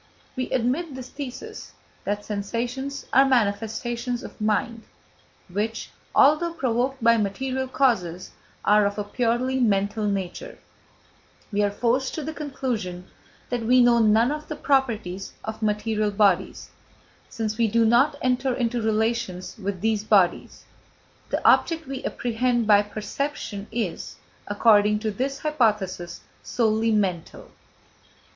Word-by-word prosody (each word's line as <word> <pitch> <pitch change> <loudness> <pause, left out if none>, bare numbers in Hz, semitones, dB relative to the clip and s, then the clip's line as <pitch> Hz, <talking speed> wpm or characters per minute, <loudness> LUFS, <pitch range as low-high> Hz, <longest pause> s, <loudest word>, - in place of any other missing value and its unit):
If - - -33
we 255 -1 -3
admit 260 +5 -1
this 260 -1 -8
thesis, 290 - -8 0.3
that 205 +1 -2
sensations 240 +7 -4
are 270 - +7
manifestations 240 0 0
of - - -11
mind 215 +2 0 0.7
which, 210 +5 -3 0.2
although 305 +4 +4
provoked 255 -1 -1
by 230 0 +5
material 260 +6 -2
causes, 190 -11 0 0.3
are 210 0 +5
of 200 - -5
a 210 - -1
purely 245 +4 0
mental 210 -1 +1
nature, 200 - -4 0.9
we 205 0 +1
are 205 - +2
forced 245 +5 0
to 315 - -4
the 315 +2 -4
conclusion 240 - -4 0.4
that 245 -1 -1
we 250 +3 +4
know 240 -1 +5
none 225 +3 +4
of 300 0 -5
the 305 - -5
properties 230 -10 -1
of 220 +1 -6
material 210 0 0
bodies, 200 -3 +1 0.6
since 220 -2 -4
we 230 - +4
do 230 +2 +2
not 250 +6 +4
enter 255 0 +1
into 240 -1 -1
relations 220 -4 -1
with 195 -2 -4
these 220 -1 +1
bodies. 200 -5 +1 0.6
The - - 0
object 325 -1 +3
we 270 -1 -6
apprehend 240 0 0
by 205 -1 +6
perception 210 0 -5
is, 220 -7 -4 0.3
according 210 0 +4
to 215 -1 -1
this 265 +6 -2
hypothesis, 210 - -1 0.2
solely 225 -1 +1
mental. 190 -6 -2
230 Hz, 130 wpm, -24 LUFS, 205-255 Hz, 0.9 s, are